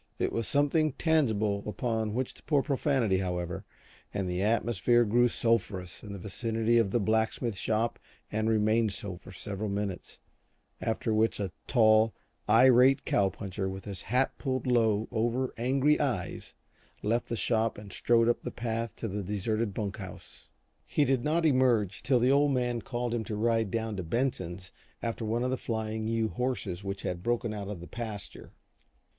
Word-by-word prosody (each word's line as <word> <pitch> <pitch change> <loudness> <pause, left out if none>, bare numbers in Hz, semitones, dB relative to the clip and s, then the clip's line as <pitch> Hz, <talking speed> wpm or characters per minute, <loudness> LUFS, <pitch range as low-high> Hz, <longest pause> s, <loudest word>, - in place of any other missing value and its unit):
It - - -1
was 115 -2 -1
something 145 +1 +2
tangible 110 -12 +1
upon 110 0 -1
which 130 0 -2
to - - -18
pour 145 -3 +2
profanity, 130 -8 +1
however, 90 -2 -3 0.5
and 95 -2 -2
the 90 +1 -1
atmosphere 115 +2 +3
grew 120 +3 +4
sulphurous 100 -7 -1
in 105 - -9
the 100 - -5
vicinity 115 +4 0
of 110 -4 +2
the 120 - +1
blacksmith 110 +1 0
shop 110 +3 -1 0.3
and 110 +1 0
remained 110 0 +2
so 95 -3 -4
for 95 - -13
several 100 +2 -4
minutes, 100 -2 -4 0.6
after 110 0 -1
which 110 +1 +2
a 100 -3 -2 0.2
tall, 110 -2 +4 0.3
irate 130 +3 +6
cow 100 -1 +2
puncher 95 -1 -4
with 95 0 -7
his 100 -4 -6
hat 125 +5 0
pulled 130 -2 -2
low 110 -4 +2
over 120 +3 0
angry 135 +5 +2
eyes 125 - -2 0.5
left 115 +3 0
the 115 - -1
shop 115 0 0
and 100 -2 -10
strode 115 -1 +3
up 120 - +2
the - - -4
path 115 -1 -3
to 115 - -4
the 105 0 -3
deserted 105 +3 -1
bunk 100 0 -4
house. 95 -3 -11 0.4
He 145 - +2
did 130 -2 +1
not 165 +2 +1
emerge 125 - +3
till 130 -2 +3
the 125 +2 +3
Old 145 +1 +4
Man 120 -2 0
called 120 0 -3
to 120 - 0
him 110 - -2
to 105 - -4
ride 115 0 +1
down 110 +1 -2
to 95 - -3
Benson's 95 -3 -2 0.3
after 115 0 -2
one 115 +2 0
of 125 - 0
the 130 - 0
Flying 110 -1 -3
U 115 -1 0
horses 115 -8 -3
which 100 0 -5
had 90 -1 -3
broken 120 +1 -1
out 100 -2 -5
of 100 -3 -5
the 85 - -9
pasture. 110 -4 -7
110 Hz, 175 wpm, -29 LUFS, 100-120 Hz, 0.6 s, irate